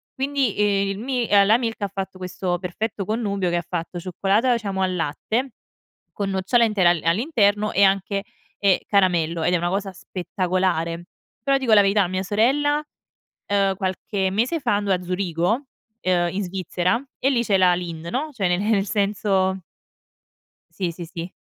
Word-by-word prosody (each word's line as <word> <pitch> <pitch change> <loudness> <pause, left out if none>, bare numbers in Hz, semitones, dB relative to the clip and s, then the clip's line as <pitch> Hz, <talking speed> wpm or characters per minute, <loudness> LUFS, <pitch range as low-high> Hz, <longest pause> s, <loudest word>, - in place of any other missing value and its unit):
Quindi, 270 -4 0
ehm, 200 -1 +2
il 195 +1 -3
mi 245 -1 -1
ehm, 200 -1 +5
la 220 +3 +5
Milka 225 -3 -3
ha - - -5
fatto 190 -1 -5
questo 180 -1 -3
perfetto 195 +3 -3
connubio 200 -4 -1
che 175 - 0
ha 170 - -3
fatto 175 0 -4
cioccolata 200 +7 +1
diciamo 200 -4 -2
al 185 -1 0
latte, 220 - -2 0.6
con 200 -1 -2
nocciole 190 +6 +2
intera 195 -5 +3
a 175 - 0
all'interno 210 - +1
e 200 - +4
anche, 195 +1 +2 0.4
ehm, 195 -3 +4
caramello, 170 -5 +2
ed 180 - +2
è - - +4
una 175 +1 -1
cosa 195 +1 -2
spettacolare. 180 -2 -2 0.4
Però 275 0 +3
dico 250 -5 +1
la 205 - +8
verità 200 +1 +3
a 180 - -1
mia 185 +1 -2
sorella, 280 +9 +2 0.7
ehm, 195 -1 +2
qualche 190 0 -2
mese 250 - 0
fa 240 -5 +1
andò 205 -1 +1
a 180 - -1
Zurigo, 180 - -1 0.4
ehm, 175 -1 +1
in 200 +1 -1
Svizzera 185 +4 -1 0.2
e 270 - +2
lì 240 -3 +1
c'è 200 -4 +2
la 180 -1 +5
Lindt, 170 -2 -6
no. 295 - -2
Cioè, 200 -6 0
nel 205 0 +1
senso 195 -2 0 1.1
Sì, 180 -3 -3
sì, 170 +1 -8
sì. 170 +1 -7
195 Hz, 175 wpm, -23 LUFS, 180-215 Hz, 1.1 s, la